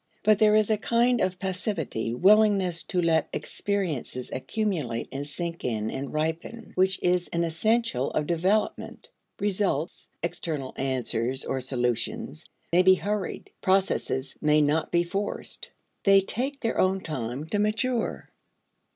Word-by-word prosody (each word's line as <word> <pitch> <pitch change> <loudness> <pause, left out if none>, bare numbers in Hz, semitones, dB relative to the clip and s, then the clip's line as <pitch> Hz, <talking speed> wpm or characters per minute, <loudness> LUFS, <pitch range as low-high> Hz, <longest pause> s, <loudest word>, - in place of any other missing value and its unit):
But 215 0 +4
there 215 -1 +5
is 215 0 +3
a 215 - +3
kind 235 +2 +2
of 185 0 0
passivity, 180 - -2
willingness 195 - +4
to 180 - -1
let 160 -1 +2
experiences 165 -11 -3
accumulate 155 - -2
and 140 +1 -4
sink 170 +3 -5
in 110 -3 -1
and 135 +1 -5
ripen, 160 +9 -3
which 190 +1 +2
is 180 0 +2
an 170 0 -1
essential 165 - +1
of 150 - -1
development. 180 +6 -1 0.3
Results 190 -6 -1
(external 165 -6 -3
answers 130 -1 -1
or 130 - -2
solutions) 125 +4 -2 0.3
may 175 - +6
be 185 0 +6
hurried; 205 0 -3
processes 185 -8 +1
may 150 0 +4
not 150 +2 +1
be 170 0 +3
forced. 195 +4 -4 0.3
They 195 -1 +7
take 265 +8 -3
their 230 - -1
own 190 +1 +2
time 130 -3 -4
to 205 - 0
mature. 225 +3 -1
175 Hz, 135 wpm, -27 LUFS, 140-205 Hz, 0.3 s, They